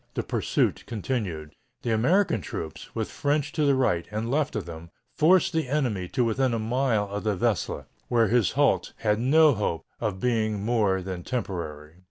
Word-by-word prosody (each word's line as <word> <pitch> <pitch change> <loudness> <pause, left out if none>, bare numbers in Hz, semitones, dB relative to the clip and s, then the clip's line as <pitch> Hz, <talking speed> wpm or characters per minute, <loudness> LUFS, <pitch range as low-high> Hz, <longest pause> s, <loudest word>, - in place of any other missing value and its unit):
The - - -1
"pursuit" - - 0
continued. 100 - -3 0.3
The 120 - -1
American 125 - +2
troops, - - -6
with - - -2
French 145 0 0
to 155 -1 0
the 140 -1 +4
right 90 -10 +1
and 110 +3 -3
left 145 -2 0
of 105 -5 -2
them, 85 0 -9 0.2
forced 180 +3 +4
the 160 -4 0
enemy 120 -11 0
to 125 +5 0
within 120 +1 +1
a - - 0
mile 115 -1 0
of 100 +1 -5
the 105 -2 0
Vesle, 110 -1 -1 0.2
where 115 -2 +3
his 115 -2 +2
halt 145 +3 +2
had 105 -1 +1
no 150 +5 +5
hope 90 -7 -2
of 105 -5 -2
being 110 -3 0
more 105 -5 +1
than 90 -1 -5
temporary. 85 -9 -5
115 Hz, 180 wpm, -26 LUFS, 95-135 Hz, 0.3 s, no